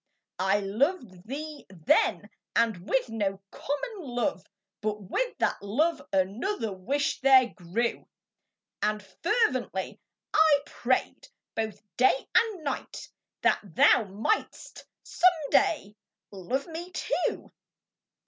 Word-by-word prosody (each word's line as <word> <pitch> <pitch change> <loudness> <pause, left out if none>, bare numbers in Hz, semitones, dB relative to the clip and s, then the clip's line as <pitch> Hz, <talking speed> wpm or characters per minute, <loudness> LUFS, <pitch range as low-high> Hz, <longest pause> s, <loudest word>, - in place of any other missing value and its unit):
I 195 +2 +2
loved 210 - -1
thee 300 +3 -6
then, 190 +3 +2 0.3
and 215 -5 +1
with 265 - +2
no 200 -3 -2
common 405 - -4
love, 245 - -2 0.4
But 210 0 -2
with - - -2
that - - 0
love 285 +12 +1
another 205 - -1
wish 280 +11 -1
there 260 -2 +5
grew. 210 +6 -2 0.7
And 210 0 0 0.2
fervently 275 - 0 0.3
I 315 -3 +6
pray'd - - -1 0.3
both 220 -2 -3 0.2
day 260 - +3
and 440 -7 +2
night 280 - -5 0.3
That - - +4
thou 200 +4 +4
might'st 205 - -3 0.2
some 340 -5 +2
day 210 -10 +2 0.4
love 235 +8 -3
me 340 +1 -7
too - - -2
240 Hz, 110 wpm, -28 LUFS, 200-310 Hz, 0.7 s, I